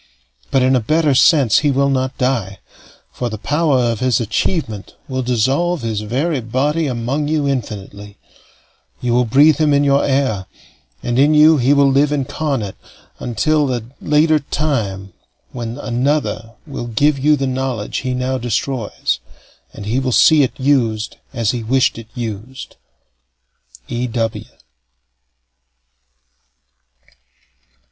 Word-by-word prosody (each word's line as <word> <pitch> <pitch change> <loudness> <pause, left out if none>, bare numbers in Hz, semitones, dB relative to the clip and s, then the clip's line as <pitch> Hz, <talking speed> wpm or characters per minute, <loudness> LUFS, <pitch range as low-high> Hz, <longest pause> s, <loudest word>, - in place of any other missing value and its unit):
But, 135 -2 +2
in 130 +1 +3
a - - +3
better 155 +5 +1
sense, 135 - +5
he 150 - +1
will 140 0 +2
not 130 0 -1
die, 120 -7 -1 0.5
for 120 - -4
the 110 - -5
power 150 +5 +1
of 120 -3 0
his 130 -2 +1
achievement 110 - -2
will 130 -2 -2
dissolve 130 +7 0
his 110 -2 -2
very 135 +8 -1
body 145 +8 0
among 130 +4 -2
you 150 -2 0
infinitely; 105 -5 -5 0.8
you 120 -1 -1
will 125 +1 +3
breathe 145 +7 +5
him 150 -2 +3
in 140 - +3
your 140 0 +3
air; 130 -9 0 0.6
and 120 +1 0
in 150 +3 +4
you 155 +1 +6
he 130 +1 +2
will 140 -1 +4
live 140 +2 +3
incarnate 135 -6 -2 0.4
until 150 +5 0
that 125 -3 -2 0.2
later 155 +1 +3
time 110 - -3 0.4
when 120 -1 -5
another 120 -3 -2
will 120 - -6
give 140 +5 +1
you 150 +3 +4
the 135 -1 -2
knowledge 130 -4 -3
he 130 -1 -2
now 130 +1 -1
destroys, 120 0 -2 0.5
and 100 - -9
he 115 +5 0
will 130 -1 -1
see 155 +5 +5
it 135 - -1
used 120 -6 0
as 115 -5 0
he 120 - -4
wished 120 +1 +1
it 115 - -11
used. 120 +2 -7 1.1
E. 120 +1 -2
W. 115 -2 -2
130 Hz, 140 wpm, -18 LUFS, 115-145 Hz, 1.1 s, you